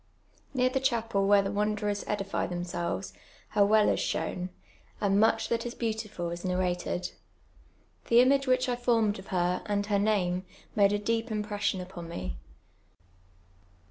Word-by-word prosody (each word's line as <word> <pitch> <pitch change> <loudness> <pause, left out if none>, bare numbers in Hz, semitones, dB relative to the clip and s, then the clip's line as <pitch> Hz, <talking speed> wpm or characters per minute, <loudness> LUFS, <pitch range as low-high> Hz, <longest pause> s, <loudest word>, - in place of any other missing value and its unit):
Near 255 0 +3
tlie 265 0 -1
chapel 225 -6 +1
where 200 0 +6
the 195 - -2
wanderers 210 0 -1
edify 195 -1 -1
themselves, 175 +1 -3 0.4
her 205 - +4
well 210 +1 +5
is - - +2
shoMii. 180 0 -2 0.5
and 200 -1 +2
mudi 225 +1 +3
that 230 0 0
is 240 - -5
Ixautiful 215 -7 -3
is 175 - -7
nanated. 180 -1 -1 1.0
The 235 - +2
ima^e 260 +3 +6
w 255 -2 +3
hieh 255 0 -2
I 245 - +1
formt 230 -4 +2
d - - -9
of 190 - -11
her. 180 -1 0
and 205 -1 0
her 205 -1 +1
name, 185 -4 +1 0.3
made 200 -1 +5
a 205 - +2
deej) 225 +3 -1
impression 210 -3 -1
upon 180 -2 -8
mc. 90 - -4
205 Hz, 160 wpm, -29 LUFS, 185-225 Hz, 1.0 s, where